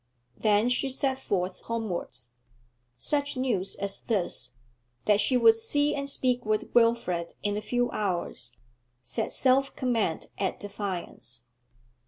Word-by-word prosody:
Then 210 +1 +3
she 250 +2 +1
set 265 0 +1
forth 185 -6 -2
homewards. 185 - -4 0.7
Such 285 - 0
news 230 -8 0
as 200 0 +2
this, 175 - -2 0.5
that 210 0 +4
she 255 - +3
would 230 -2 +7
see 290 +7 +1
and 280 0 -2
speak 250 -3 +1
with 215 0 -1
Wilfrid 230 -8 +2
in 205 0 0
a 210 - -2
few 245 +2 0
hours, 175 - -2 0.5
set 225 - -2
self 270 +1 +2
command 230 - 0
at 190 -1 -1
defiance. 180 - -5
215 Hz, 130 wpm, -28 LUFS, 185-250 Hz, 0.7 s, would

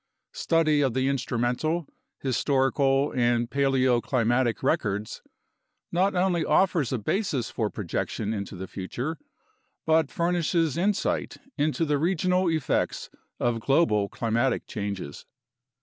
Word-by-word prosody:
Study 155 -3 +2
of 130 -4 +1
the 130 0 +1
instrumental, 135 +5 -1 0.3
historical, 135 +1 +1
and 120 -1 +1
paleoclimatic 130 -3 +1
records 110 -8 -1 0.7
not 185 +3 +1
only 180 -2 +2
offers 175 -9 +2
a 130 - 0
basis 130 - -1
for 110 -3 -1
projection 105 +2 -3
into 100 -2 -5
the 95 +1 -6
future 125 - -5 0.7
but 160 -2 +3
furnishes 170 -2 0
insight 200 +4 0 0.2
into 155 +3 0
the 145 -2 +1
regional 180 +2 +1
effects 160 -4 -1 0.3
of 120 -1 0
global 110 -7 +2
climatic 120 +3 0
changes. 100 - -5
135 Hz, 110 wpm, -26 LUFS, 120-165 Hz, 0.7 s, but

